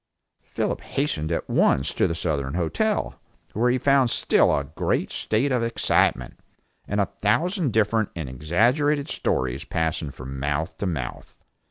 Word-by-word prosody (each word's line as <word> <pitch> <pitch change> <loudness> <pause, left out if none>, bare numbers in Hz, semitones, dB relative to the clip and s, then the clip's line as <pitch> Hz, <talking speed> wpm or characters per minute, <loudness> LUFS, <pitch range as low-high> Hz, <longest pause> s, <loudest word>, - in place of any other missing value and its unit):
Philip - - -3
hastened 85 - -2
at 85 - -2
once 65 - +2
to - - +2
the 85 - -2
Southern 70 -4 -2
Hotel, 205 - -1 0.3
where 120 +4 +2
he 125 - +2
found 135 -1 +3
still - - +3
a 70 - -1
great 70 +3 -2
state 120 +6 0
of 125 -2 +1
excitement, 115 - +1 0.5
and 105 - -1
a 100 - +3 0.2
thousand 160 - +1
different 110 0 +2
and 80 -5 -4
exaggerated 120 - +1
stories 65 +1 -1
passing 80 -2 -2
from 65 0 -8
mouth 75 +5 -2
to 100 - -2
mouth. 70 -9 -5
95 Hz, 150 wpm, -24 LUFS, -, 0.5 s, found